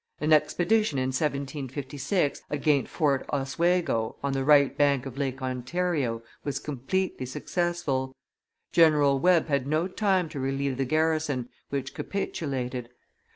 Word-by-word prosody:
An 155 +1 +3
expedition, 175 +3 +2
in 130 0 0
1756, 140 +2 -2
against 145 -2 +1
Fort 140 -5 +1
Oswego, 145 -3 0
on 140 -1 0
the 135 0 0
right 140 -1 +5
bank 140 -2 +2
of 135 -2 -7
Lake 135 -1 -3
Ontario, 130 -1 -1 0.2
was 145 - -2
completely 140 +1 -2
successful; 140 -4 -2 0.6
General 150 -4 +5
Webb 175 +2 +4
had 140 -3 0
no 155 +4 +1
time 190 -3 +1
to 150 -3 -6
relieve 135 0 -1
the 135 - 0
garrison, 155 -3 0 0.2
which 135 -1 -3
capitulated. 130 -10 -3
140 Hz, 125 wpm, -27 LUFS, 130-160 Hz, 0.6 s, right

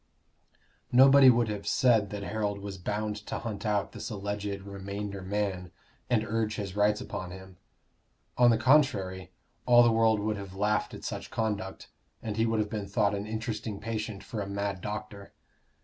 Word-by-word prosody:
Nobody 135 +1 +8
would 120 -2 +4
have 105 -1 -5
said 115 -5 +3
that 105 -1 -5
Harold 100 +1 -2
was 100 -1 -7
bound 105 +3 -2
to 105 - -5
hunt 110 -1 -5
out 105 -2 0
this - - -6
alleged 100 -1 -4
remainder 100 0 -6
man 95 -2 -2 0.4
and 110 -3 +2
urge 110 -1 -1
his 100 -3 -5
rights 105 +1 +2
upon 90 - -5
him; 95 0 -11 0.8
on 120 -1 +6
the 115 - +4
contrary, 105 -9 +2 0.4
all 120 -1 +8
the 120 - +4
world 110 -1 +3
would 105 +1 -1
have 100 -2 -8
laughed 105 +2 0
at - - -11
such - - -5
conduct, 105 -4 -3 0.4
and 110 -2 -3
he 115 +1 +2
would 115 0 0
have 105 - +1
been 105 -2 -3
thought 100 0 +1
an 100 +1 -3
interesting 110 -1 -4
patient 110 -1 -4
for 110 - -5
a 100 - -4
mad 100 -1 -3
doctor. 105 -1 -6
105 Hz, 175 wpm, -29 LUFS, 100-110 Hz, 0.8 s, Nobody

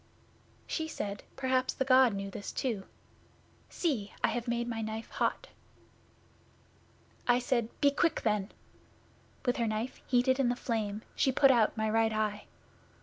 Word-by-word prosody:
'She 320 -1 -2
said, 205 -9 -4
"Perhaps 260 -1 0
the 265 - 0
God 255 -4 +5
knew 195 0 -4
this 200 - -6
too. 220 -7 -2 0.8
See! 245 - -1
I - - +4
have 240 0 -3
made 235 0 -1
my 225 -1 -3
knife 220 +1 -5
hot." - - -1 1.8
'I 245 0 +5
said, 240 -2 -1
"Be 285 - +5
quick, 325 +3 +1
then!" 210 -3 0 0.9
With 245 - +1
her 235 -2 +1
knife 215 +4 -3
heated 255 +1 +3
in 260 -3 +3
the 245 - +1
flame 220 -3 -2
she 265 - +3
put 270 +1 +6
out 230 -3 +3
my 220 0 0
right 225 +1 +2
eye. 215 -1 -1
235 Hz, 150 wpm, -31 LUFS, 215-260 Hz, 1.8 s, put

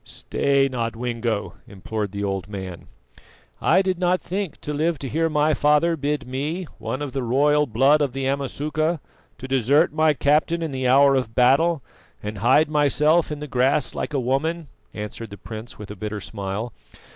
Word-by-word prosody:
"Stay, 140 -1 0
Nodwengo," 115 -3 -3
implored 100 +1 -4
the 100 0 -4
old 95 -3 -2
man. 95 -4 -7 0.7
"I 185 +4 +4
did 185 -2 -1
not 180 0 +2
think 190 -2 -4
to 150 - -4
live 160 +2 0
to 135 - -6
hear 165 +5 0
my 155 0 +2
father 150 +3 +3
bid 145 -2 -2
me, 145 +8 -3 0.2
one 135 +3 -3
of 145 - -4
the 135 - -2
royal 145 +5 +2
blood 135 +7 +4
of 140 -3 +1
the 135 +1 -3
Amasuka, 150 +4 -1 0.4
to 130 0 -8
desert 135 +5 +3
my 155 -1 +3
captain 155 +5 +2
in 160 - -3
the 130 -1 -1
hour 140 +2 +6
of 125 -4 -1
battle 140 +4 +3 0.4
and 105 -1 -5
hide 135 +9 +4
myself 150 +2 +2
in 150 -1 -5
the 150 - -5
grass 130 +2 +1
like 150 - -4
a - - +2
woman," 145 +5 -1 0.3
answered 105 +1 -6
the 100 - -10
prince 110 +2 -9
with 105 -1 -9
a - - -7
bitter 105 +1 -5
smile. 100 +3 -5
135 Hz, 180 wpm, -23 LUFS, 115-150 Hz, 0.7 s, hour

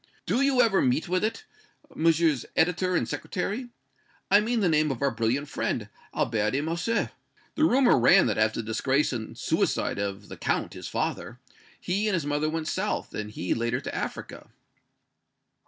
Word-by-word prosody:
Do 250 - +1
you 275 -2 +4
ever 215 -5 +3
meet 130 +4 +1
with 185 +2 0
it, 225 - -2 0.5
Messrs. 160 -4 +2
editor 180 +2 +2
and - - +1
Secretary 235 +7 -3 0.6
I 200 - +8
mean 230 +2 0
the 190 - +3
name 155 -2 +3
of 135 -4 -3
our 140 -1 +1
brilliant 115 +5 -1
friend, 110 -6 -2 0.2
Albert 110 -2 0
de 135 - +1
Morcerf? 170 +9 -1 0.4
The 310 - +2
rumor 255 - +4
ran 120 - +6
that, 110 -2 0
after 110 +1 +1
the - - -12
disgrace 130 +6 +1
and 110 -3 -6
suicide - - 0
of 100 0 -4
the - - -9
Count, - - -1
his - - -7
father, 120 - -3 0.4
he 200 +4 -1
and 205 - +1
his 165 -5 -2
mother 145 +1 0
went 160 0 -3
south, 200 +5 -2
and 105 0 -4
he 90 -4 -2
later 115 +2 -1
to - - -6
Africa." - - -6
155 Hz, 175 wpm, -27 LUFS, 115-190 Hz, 0.6 s, I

